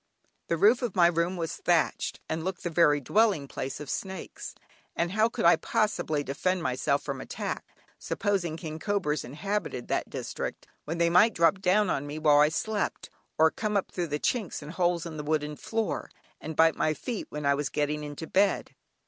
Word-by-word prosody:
The 170 - 0
roof 215 +8 +5
of 240 -6 -2
my 175 -2 +6
room 170 +2 +1
was 165 -2 -3
thatched, 170 -3 0
and 160 0 -3
looked 185 0 -4
the 175 - -2
very 150 -3 +4
dwelling 195 - +2
place 135 0 -5
of 150 - -7
snakes, 190 +4 -5 0.4
and 170 +1 0
how 215 +3 +3
could - - -2
I 170 - +7
possibly 160 -5 0
defend 175 +6 -1
myself 140 +2 0
from 140 -2 -4
attack - - -4 0.4
(supposing 180 -6 -1
king 160 -2 -6
cobras 180 -7 -1
inhabited 160 -1 -3
that - - -1
district), - - -5 0.2
when 165 +3 -3
they 170 0 +3
might 210 +6 +5
drop 170 +3 +4
down 195 +1 +3
on 140 +1 -2
me 145 +1 -5
while 150 -2 +5
I 150 +1 +6
slept, 210 +6 -2 0.3
or 160 0 +5
come 210 -1 -1
up 195 - -2
through 175 -2 -2
the 150 -1 -1
chinks 210 -8 -1
and 150 - -7
holes 175 -1 0
in 160 -2 -6
the 150 - -4
wooden 150 0 -1
floor, 225 +7 -3 0.3
and 160 0 -6
bite 160 +1 +5
my 155 - +1
feet 235 +3 -5
when 150 -1 -5
I 140 - +4
was 140 0 -1
getting 150 0 -1
into 145 +2 -6
bed? 195 +4 +1
165 Hz, 195 wpm, -28 LUFS, 150-190 Hz, 0.4 s, I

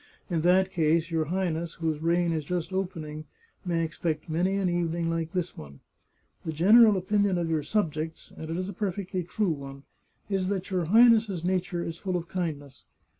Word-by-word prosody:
In 165 -2 +1
that 185 +2 +3
case 165 0 +1
your 160 -1 +1
Highness, 170 -1 -2
whose 160 -2 -2
reign 170 +1 +2
is 155 -2 -2
just 175 +3 -3
opening, 155 -5 -4 0.4
may 170 -3 0
expect 160 -1 -3
many 180 +4 +1
an 195 -2 +1
evening 170 -1 0
like 165 -1 -2
this 180 -2 -3
one. 70 -2 -11 0.6
The 160 - -3
general 210 +6 +6
opinion 200 0 +1
of 170 -1 -1
your 155 -2 +1
sub 165 +1 0
jects, 160 +1 -6
and 160 - -8
it 165 - -2
is 185 0 -2
a 200 - -5
perfectly 190 -1 -3
true 180 +2 -1
one, 140 -2 -7 0.4
is 195 -2 -1
that 195 -1 -3
your 180 -3 0
Highness's 220 -2 +5
nature 180 -1 -1
is 165 +1 -6
full 185 -2 -1
of 170 -1 -6
kindness. 150 -7 -5
175 Hz, 185 wpm, -27 LUFS, 160-190 Hz, 0.6 s, general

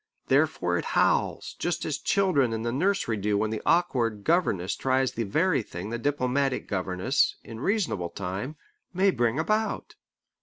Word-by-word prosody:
Therefore - - +2
it - - -5
howls, - - +1
just - - -1
as - - -2
children 160 - +2
in 110 0 -3
the 120 - -1
nursery 160 - 0
do 105 +1 0
when 110 +1 0
the 110 - -3
awkward 120 -12 +1
governess 105 - +1
tries 130 0 +1
the 115 - -3
very 155 - +2
thing 100 0 -7
the 120 - -3
diplomatic 135 0 0
governess, 95 +6 0
in 115 -1 -9
reasonable 150 - 0
time, 100 - -5 0.4
may 195 +2 +4
bring 120 -3 0
about. 215 +7 -1
125 Hz, 155 wpm, -27 LUFS, 105-160 Hz, 0.4 s, may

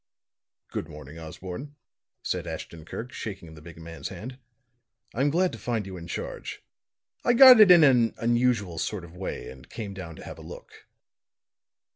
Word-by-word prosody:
"Good 80 - -4
morning, 75 +1 -10
Osborne," 95 - -8 0.5
said - - -2
Ashton 80 -2 -7
Kirk, 120 +8 -7
shaking 95 -7 -7
the 75 - -13
big 85 +1 -12
man's 80 -3 -7
hand. 125 +4 -8 0.7
"I'm 135 +5 +2
glad 180 +4 +2
to - - -9
find 115 -4 -2
you 95 -1 -7
in 85 -1 -8
charge. - - -6 0.6
I 240 - +4
got 255 -1 +10
it 210 -3 +9
in 175 -3 +9
an 125 -5 +4
unusual 115 -7 +1
sort 105 +1 -3
of 85 +1 -15
way, 95 +1 -5
and 65 -1 -14
came 105 -3 -6
down 85 -4 -8
to - - -11
have - - -9
a - - -10
look." - - -12
100 Hz, 170 wpm, -27 LUFS, 85-125 Hz, 0.7 s, got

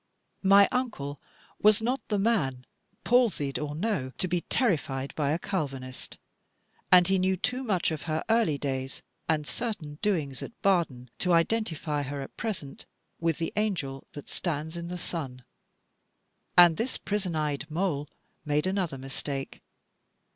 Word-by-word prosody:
My 200 +1 +7
Uncle 145 - -2 0.4
was 215 +1 +6
not 245 +3 0
the 210 - +1
man, 155 - +1 0.4
palsied 220 - +3
or 150 -1 -3
no, 170 - -1
to 185 - +1
be 175 0 0
terrified 145 - 0
by 145 -3 0
a 155 - +2
Calvinist: 135 -9 -4 0.7
and 180 -1 +8
he 190 0 +3
knew 190 +1 +2
too 245 +7 -1
much 190 -8 +1
of 155 -2 -3
her 155 +1 0
early 225 -10 +3
days, 135 -1 -3 0.3
and 155 -2 +2
certain 170 -9 -4
doings 160 -11 0
at - - -8
Baden, 150 -11 +1
to 180 -1 +2
identify 165 -5 +1
her 140 +1 -4
at 135 - -7
present 190 - -5 0.3
with 165 -2 +1
the 165 - -2
angel 175 -11 -1
that 145 - -8
stands 160 -1 -2
in 170 0 -5
the 180 +1 -4
sun. 135 -8 -4 1.1
And 175 -2 +8
this 240 +4 -1
prison 190 -4 -2
eyed 150 0 -1
mole 155 -3 -1 0.4
made 150 0 +1
another 185 -7 0
mistake. 135 +1 -5
165 Hz, 145 wpm, -28 LUFS, 145-200 Hz, 1.1 s, and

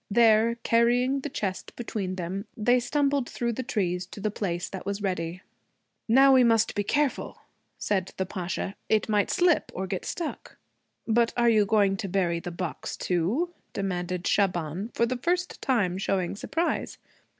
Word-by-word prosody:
There, 225 +1 +4
carrying 245 +3 +3
the 295 - -5
chest 195 -7 -4
between 200 -6 -3
them, 190 +3 -4
they 245 +3 +3
stumbled 280 0 0
through 235 -1 -2
the 260 - -3
trees 180 -8 -1
to 200 - -10
the 210 +1 -1
place 175 -4 -2
that 190 - -7
was 200 +1 -3
ready. 180 -1 -2 0.6
'Now 270 +4 +6
we 260 -1 +6
must 225 -2 +3
be 205 - -1
careful,' 290 +6 0 0.4
said 190 -3 -1
the 190 - 0
Pasha. 185 +1 -4 0.2
'It 215 -1 +2
might 210 -2 +2
slip 350 -2 +2
or 190 - -2
get 190 -1 -4
stuck.' 335 -4 -5 0.5
'But 230 +1 +2
are 235 -1 +4
you 215 -3 +4
going 200 -2 +3
to 195 - -4
bury 175 -3 +1
the 175 - -6
box 175 -1 -5
too?' 210 - 0 0.2
demanded 180 -2 -3
Shaban, 180 0 0
for 235 - +3
the 250 +2 -2
first 355 +7 -1
time 195 -8 +1
showing 195 -1 -1
surprise. 330 +11 -2
210 Hz, 165 wpm, -27 LUFS, 185-240 Hz, 0.6 s, Now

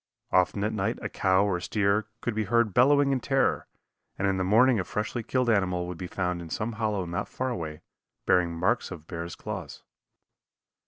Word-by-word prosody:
Often 95 +2 +2
at 105 - 0
night 95 -3 -1
a - - -2
cow 95 +1 +2
or 95 -3 0
steer 100 +3 +1
could 120 - -2
be 110 0 -1
heard 115 0 +2
bellowing 140 +2 +5
in 135 - +1
terror, 135 +2 +1 0.5
and 95 - 0
in 95 -1 +1
the 95 - 0
morning 115 +5 +4
a - - 0
freshly 110 +5 -3
killed 125 +2 0
animal 95 -5 +1
would 90 -1 -7
be 90 - -4
found 90 -1 -2
in 85 - -8
some 105 +7 -2
hollow 105 -4 -1
not 85 0 -3
far 130 0 -2
away, 80 -8 -5 0.4
bearing 90 -2 +3
marks 90 +9 0
of 80 - -9
bear's 85 0 -6
claws. - - -7
100 Hz, 195 wpm, -27 LUFS, 90-115 Hz, 0.5 s, bellowing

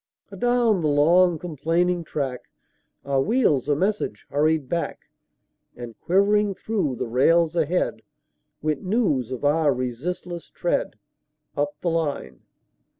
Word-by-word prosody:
Adown 240 -5 +2
the 155 - +1
long, 165 +4 +4
complaining 170 +2 -1
track, 135 -5 -4 0.6
Our 135 -1 +1
wheels 170 - +1
a 145 - +3
message 190 - -2
hurried 155 -1 +1
back; 170 +5 -4 0.6
And 120 -2 -9
quivering 200 +2 +2
through 195 - -2
the - - -3
rails 160 +8 +3
ahead, 170 +2 0 0.6
Went 155 -2 -1
news 185 - 0
of 130 +2 -4
our 150 0 +3
resistless 150 +8 -4
tread, - - -2 0.6
Up 145 0 -1
the 175 - 0
line. 145 - -2
160 Hz, 120 wpm, -24 LUFS, 140-180 Hz, 0.6 s, long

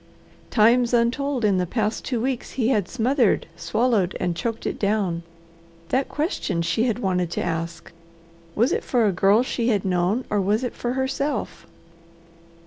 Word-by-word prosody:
Times 240 +2 +4
untold 250 +1 +1
in 195 -3 +3
the 180 - -1
past 215 +2 -1
two 245 - -2
weeks 255 +1 -3
he 245 -3 +1
had 210 -8 +1
smothered, 250 -1 +2
swallowed, 215 -2 0
and 180 -2 -1
choked 225 +6 -3
it - - -3
down. 200 -5 0 0.7
That 265 +1 0
question 295 - -1
she 225 +7 +1
had 230 -3 0
wanted 180 -6 0
to - - -2
ask 165 0 -4 0.6
was 235 +5 +2
it - - 0
for 240 -3 +2
a 205 - +3
girl 195 +5 +4
she 240 -2 -2
had 210 -6 +1
known, 185 +6 +1
or 205 -1 +2
was 210 +5 +1
it 245 - -3
for 240 0 -3
herself? 265 +2 -2
220 Hz, 165 wpm, -23 LUFS, 185-250 Hz, 0.7 s, Times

